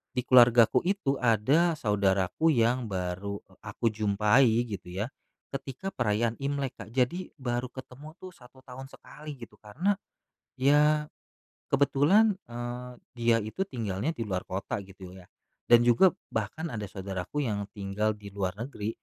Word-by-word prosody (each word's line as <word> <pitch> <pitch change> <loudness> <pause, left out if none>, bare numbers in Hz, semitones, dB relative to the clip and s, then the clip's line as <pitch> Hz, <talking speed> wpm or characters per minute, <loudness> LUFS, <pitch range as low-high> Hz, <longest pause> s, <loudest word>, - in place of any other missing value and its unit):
di 125 - +1
keluargaku 120 -2 +6
itu 170 -9 0
ada 135 +9 +3
saudaraku 100 - +1
yang 120 -2 +2
baru 95 +2 -3 0.3
aku 110 +2 -1
jumpai 105 +4 +3 0.2
gitu 100 -5 -7
ya, 115 - -3 0.5
ketika 135 +7 -5
perayaan 115 -1 0
Imlek, 140 -1 -2
Kak, - - -9
jadi 135 +9 0
baru 120 -1 -2
ketemu 135 +4 -11
tuh 185 0 -10
1 130 0 -18
tahun 130 +1 -9
sekali 150 +1 -11
gitu 115 - -13
karena, 160 - 0 0.6
ya 150 +3 +3 0.6
kebetulan, 160 +10 +4
eee, 120 +1 -6 0.3
dia 115 -1 +3
itu 110 - -3
tinggalnya 115 - -3
di 120 - -7
luar 95 -4 -3
kota 95 +2 -4
gitu 95 -1 -12
ya. 90 - -14 0.4
Dan 120 0 +8
juga 150 +11 +6 0.2
bahkan 160 +1 -3
ada 105 -2 -4
saudaraku 95 +7 -4
yang 105 -3 -1
tinggal 105 +1 -1
di 100 -1 -10
luar 95 -2 -2
negeri, 115 -4 -4
120 Hz, 140 wpm, -28 LUFS, 105-140 Hz, 0.6 s, Dan